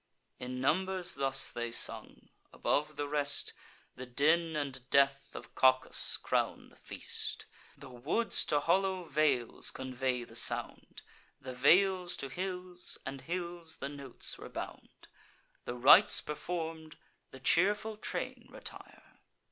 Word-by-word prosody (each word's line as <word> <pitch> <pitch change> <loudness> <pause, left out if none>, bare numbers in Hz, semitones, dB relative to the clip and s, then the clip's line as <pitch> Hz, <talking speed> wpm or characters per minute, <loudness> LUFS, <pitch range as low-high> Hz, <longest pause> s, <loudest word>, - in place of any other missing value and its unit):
In 125 0 -5
numbers 185 +6 0
thus 135 -1 +1
they 120 0 -3
sung; 115 - 0 0.2
above 150 +1 0
the 145 0 -3
rest, 145 0 0 0.4
The 130 0 -8
den 160 +6 +2
and 135 -4 -4
death 140 0 +2
of - - -9
Cacus 130 0 +3
crown - - -1
the - - -21
feast. - - -6 0.3
The - - -11
woods 155 - 0
to 145 -1 +1
hollow 185 +3 +1
vales 145 -7 0
convey 130 -1 -2
the - - -13
sound, - - -1 0.4
The 130 -2 -7
vales 180 +7 +4
to 135 - -5
hills, 180 +2 -5
and 135 0 -6
hills 170 -1 -5
the 140 - -5
notes 140 -3 -4
rebound. - - -9 0.6
The 120 - -4
rites 145 - +7
perform'd, 160 0 -5 0.3
the 130 - -12
cheerful 205 +9 +2
train 210 - -4
retire. - - -10
145 Hz, 125 wpm, -32 LUFS, 130-175 Hz, 0.6 s, rites